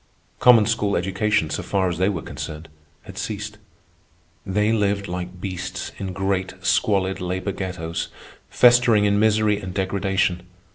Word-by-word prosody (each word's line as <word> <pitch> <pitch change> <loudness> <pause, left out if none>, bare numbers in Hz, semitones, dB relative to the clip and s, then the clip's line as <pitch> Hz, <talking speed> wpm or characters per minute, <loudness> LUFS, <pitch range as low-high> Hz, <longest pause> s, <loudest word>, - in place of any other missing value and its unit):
Common 120 -4 +7
school 105 -2 0
education, 95 -1 0
so - - -2
far 95 -2 0
as 85 -1 -3
they 95 +2 +3
were 90 -6 -3
concerned, 80 +1 -7 0.3
had - - -9
ceased. 105 0 -5 0.8
They 105 +3 +1
lived 100 -2 0
like 90 0 -5
beasts 95 -1 -5
in 95 -1 -4
great 95 0 -2
squalid 95 -3 +1
labor 90 +2 -2
ghettos, 90 -4 -4 0.4
festering 120 -4 +5
in 100 0 +2
misery 110 -1 +3
and 95 -1 -7
degradation. 95 -2 0
95 Hz, 140 wpm, -23 LUFS, 90-105 Hz, 0.8 s, Common